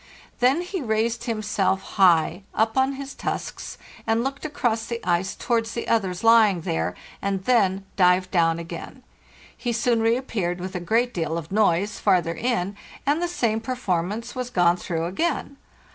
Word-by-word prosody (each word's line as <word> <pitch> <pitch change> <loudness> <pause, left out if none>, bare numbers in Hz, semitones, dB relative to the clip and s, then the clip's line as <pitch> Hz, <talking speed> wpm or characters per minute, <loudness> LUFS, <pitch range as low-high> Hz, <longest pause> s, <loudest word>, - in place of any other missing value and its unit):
Then 260 +7 +3
he 360 0 -4
raised 230 0 0
himself 210 -4 0
high 180 -2 +3
up 220 0 +1
on 265 +1 +2
his 275 0 -7
tusks, - - -5 0.3
and 225 +1 +2
looked 270 +1 -4
across 230 -7 -1
the 235 -1 -3
ice 175 +2 +1
towards 230 -2 -1
the 235 - -4
others 190 -5 0
lying 220 -6 +5
there, 80 - -2 0.3
and 195 -1 -1
then 195 -5 +2
dived 185 0 +4
down 165 -3 +3
again. 170 0 -8 0.5
He 240 - -3
soon 235 0 +1
reappeared, 225 -7 0
with 185 +1 -5
a 180 - -2
great 230 +8 +1
deal 165 -1 -2
of 165 0 -7
noise, 200 -1 +2
farther 180 -4 +2
in, 205 -1 -1 0.3
and 290 +4 +2
the 350 - +1
same 230 -10 0
performance 220 -2 -2
was 250 -1 -4
gone 175 -5 +3
through 165 -2 -3
again. 280 - -2
215 Hz, 160 wpm, -24 LUFS, 180-240 Hz, 0.5 s, lying